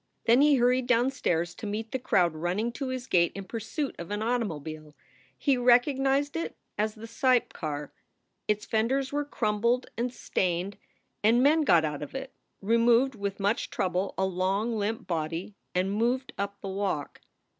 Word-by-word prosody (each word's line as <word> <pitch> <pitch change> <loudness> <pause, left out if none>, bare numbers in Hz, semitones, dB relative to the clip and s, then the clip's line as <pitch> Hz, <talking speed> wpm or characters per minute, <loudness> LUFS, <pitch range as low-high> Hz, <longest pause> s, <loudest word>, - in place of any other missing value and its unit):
Then 235 +4 +5
he 295 0 +6
hurried 250 0 +2
downstairs 230 -9 +1
to 215 - -7
meet 220 +2 -4
the 260 - -1
crowd 175 -8 +2
running 180 +9 -1
to 270 +3 -4
his 255 -1 -4
gate 170 -8 +3
in 195 - -5
pursuit 230 - -4
of 170 - -6
an 205 +1 -2
automobile. 155 - -3 0.4
He 275 -2 +2
recognized 270 +4 +3
it 330 - -3 0.2
as 215 +1 -1
the 220 +1 -9
Seipp 245 +2 +2
car. 150 -2 -5 0.5
Its 210 0 0
fenders 260 +5 0
were 290 0 +1
crumpled 235 -2 0
and 240 +1 -1
stained, 185 -3 -2 0.5
and 235 +4 +5
men 310 +3 +5
got 170 - +4
out 150 -1 -3
of 150 - -7
it, 270 0 -6 0.3
removed 235 +4 +4
with 200 -2 -4
much 200 +3 0
trouble 185 +1 -1
a 190 - +2
long 190 +5 0
limp 215 +1 -2
body, 165 +3 -3 0.2
and 185 +2 +1
moved 245 +5 0
up 200 0 -4
the 195 - -5
walk. 190 -7 -3
220 Hz, 165 wpm, -28 LUFS, 185-250 Hz, 0.5 s, he